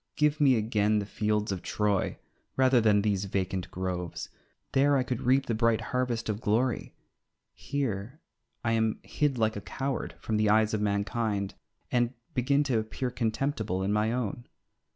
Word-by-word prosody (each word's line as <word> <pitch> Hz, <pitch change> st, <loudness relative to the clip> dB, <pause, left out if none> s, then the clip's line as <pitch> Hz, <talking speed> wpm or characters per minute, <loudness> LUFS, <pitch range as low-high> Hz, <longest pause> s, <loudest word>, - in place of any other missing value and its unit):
Give 150 Hz, 0 st, +2 dB
me 135 Hz, -3 st, +6 dB
again 110 Hz, -1 st, +2 dB
the 105 Hz, -, -1 dB
fields 105 Hz, 0 st, -1 dB
of 95 Hz, -2 st, -3 dB
Troy, 105 Hz, -2 st, 0 dB, 0.4 s
rather 130 Hz, -2 st, +5 dB
than 105 Hz, -2 st, +4 dB
these 100 Hz, -2 st, +1 dB
vacant 95 Hz, -1 st, -2 dB
groves. 90 Hz, -2 st, -4 dB, 0.4 s
There 140 Hz, +1 st, +4 dB
I 130 Hz, -, +2 dB
could 125 Hz, -2 st, -3 dB
reap 130 Hz, +2 st, +3 dB
the 115 Hz, -, -1 dB
bright 115 Hz, 0 st, +2 dB
harvest 125 Hz, -2 st, 0 dB
of 105 Hz, 0 st, -2 dB
glory; 120 Hz, +4 st, 0 dB, 0.6 s
here 115 Hz, -, -3 dB, 0.4 s
I 115 Hz, -, +1 dB
am 110 Hz, -1 st, +1 dB
hid 145 Hz, -3 st, 0 dB
like 110 Hz, -1 st, +1 dB
a 105 Hz, -, -4 dB
coward 135 Hz, +4 st, -3 dB
from 110 Hz, -, -1 dB
the 105 Hz, 0 st, +3 dB
eyes 110 Hz, +1 st, +4 dB
of 105 Hz, -, 0 dB
mankind, 100 Hz, -1 st, -1 dB, 0.4 s
and 120 Hz, 0 st, +1 dB, 0.2 s
begin 140 Hz, +3 st, +2 dB
to 130 Hz, -6 st, +1 dB
appear 115 Hz, +3 st, -3 dB
comtemptible 110 Hz, -4 st, -1 dB
in 100 Hz, -, +1 dB
my 105 Hz, +1 st, +2 dB
own. 120 Hz, -1 st, -3 dB
110 Hz, 165 wpm, -29 LUFS, 105-125 Hz, 0.6 s, me